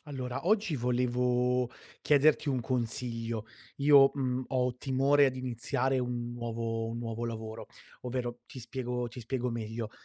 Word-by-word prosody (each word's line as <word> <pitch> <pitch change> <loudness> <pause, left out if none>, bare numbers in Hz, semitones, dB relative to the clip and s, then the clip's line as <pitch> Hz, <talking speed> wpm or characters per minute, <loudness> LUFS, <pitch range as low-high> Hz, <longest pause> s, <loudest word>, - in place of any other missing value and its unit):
Allora 130 +1 -5
oggi 205 -7 +2
volevo 125 0 +1 0.3
chiederti 150 +1 +4
un 130 -3 +1
consiglio. 115 -2 -2 0.3
Io, 140 -1 +7
mhmm, 130 -2 -1
ho 125 -2 +1
timore 135 +2 +3
ad 130 - -1
iniziare 130 +1 -1
un 120 -1 -2
nuovo 115 -1 -3
un 115 - -4
nuovo 115 0 -4
lavoro; 110 -1 -5 0.4
ovvero 120 -1 -3
ti - - -10
spiego 125 -1 -3
ti 125 +2 -9
spiego 125 +1 -2
meglio. 110 -1 -4
125 Hz, 135 wpm, -31 LUFS, 120-130 Hz, 0.4 s, Io